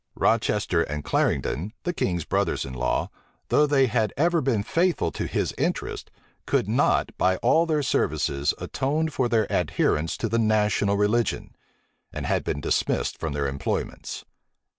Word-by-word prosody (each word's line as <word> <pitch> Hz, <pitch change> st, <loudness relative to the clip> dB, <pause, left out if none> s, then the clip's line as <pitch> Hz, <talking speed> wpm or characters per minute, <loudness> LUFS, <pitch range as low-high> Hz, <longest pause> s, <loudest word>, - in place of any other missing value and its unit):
Rochester 105 Hz, -6 st, +1 dB
and 75 Hz, -2 st, -3 dB
Clarendon, 90 Hz, +10 st, 0 dB
the 175 Hz, -, -1 dB
king's 90 Hz, -, -1 dB
brothers -, -, 0 dB
in 65 Hz, -, -7 dB
law, 65 Hz, 0 st, -1 dB, 0.4 s
though 150 Hz, -, +4 dB
they 140 Hz, -2 st, +4 dB
had 115 Hz, -3 st, 0 dB
ever 170 Hz, +2 st, +2 dB
been 120 Hz, -6 st, +1 dB
faithful 170 Hz, -, +1 dB
to -, -, -4 dB
his -, -, -1 dB
interests, -, -, -2 dB, 0.4 s
could -, -, +1 dB
not, -, -, +1 dB
by 95 Hz, 0 st, +3 dB
all 160 Hz, +8 st, +3 dB
their 155 Hz, -2 st, +1 dB
services, 70 Hz, -, 0 dB
atone 155 Hz, +4 st, -1 dB
for 130 Hz, -5 st, -1 dB
their 110 Hz, -2 st, +2 dB
adherence 80 Hz, +2 st, 0 dB
to 115 Hz, -, -1 dB
the 115 Hz, +2 st, 0 dB
national 105 Hz, -2 st, +2 dB
religion; 105 Hz, +2 st, 0 dB, 0.6 s
and -, -, -5 dB
had -, -, 0 dB
been 70 Hz, -, -3 dB
dismissed -, -, 0 dB
from 80 Hz, -3 st, -3 dB
their 70 Hz, -1 st, -1 dB
employments. 70 Hz, 0 st, -4 dB
110 Hz, 155 wpm, -25 LUFS, 85-135 Hz, 0.6 s, though